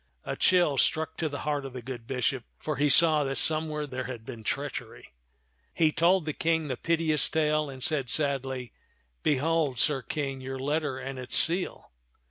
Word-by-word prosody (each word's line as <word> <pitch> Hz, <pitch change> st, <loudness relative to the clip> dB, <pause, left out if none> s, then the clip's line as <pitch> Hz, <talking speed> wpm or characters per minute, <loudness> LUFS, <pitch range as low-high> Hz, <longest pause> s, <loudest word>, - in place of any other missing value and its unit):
A -, -, -4 dB
chill 175 Hz, -7 st, +3 dB
struck 160 Hz, 0 st, +1 dB
to 160 Hz, -, -1 dB
the 145 Hz, -, -6 dB
heart 145 Hz, -2 st, -1 dB
of 135 Hz, -2 st, -8 dB
the 125 Hz, -, -6 dB
good 120 Hz, -3 st, -7 dB
bishop, 130 Hz, -1 st, -1 dB
for 155 Hz, -3 st, -4 dB
he 145 Hz, +2 st, +2 dB
saw 155 Hz, +1 st, +5 dB
that 135 Hz, -1 st, -2 dB
somewhere 155 Hz, -1 st, 0 dB
there 130 Hz, -2 st, -5 dB
had 120 Hz, -3 st, -7 dB
been 115 Hz, -1 st, -8 dB
treachery. 140 Hz, +5 st, -5 dB, 0.6 s
He 160 Hz, -2 st, +3 dB
told 170 Hz, +2 st, +3 dB
the 155 Hz, -, -2 dB
King 160 Hz, -1 st, 0 dB
the 130 Hz, -, -1 dB
piteous 160 Hz, 0 st, +3 dB
tale, 155 Hz, -1 st, +1 dB
and 130 Hz, -2 st, -6 dB
said 140 Hz, -6 st, +1 dB
sadly, 135 Hz, -4 st, 0 dB, 0.3 s
" -, -, -43 dB
Behold, 150 Hz, -1 st, +1 dB
Sir 135 Hz, +2 st, +1 dB
King, 135 Hz, -1 st, -4 dB
your 135 Hz, +1 st, -5 dB
letter 145 Hz, 0 st, -1 dB
and 130 Hz, 0 st, -6 dB
its 125 Hz, 0 st, +1 dB
seal. 175 Hz, +3 st, +2 dB
145 Hz, 185 wpm, -28 LUFS, 130-155 Hz, 0.6 s, saw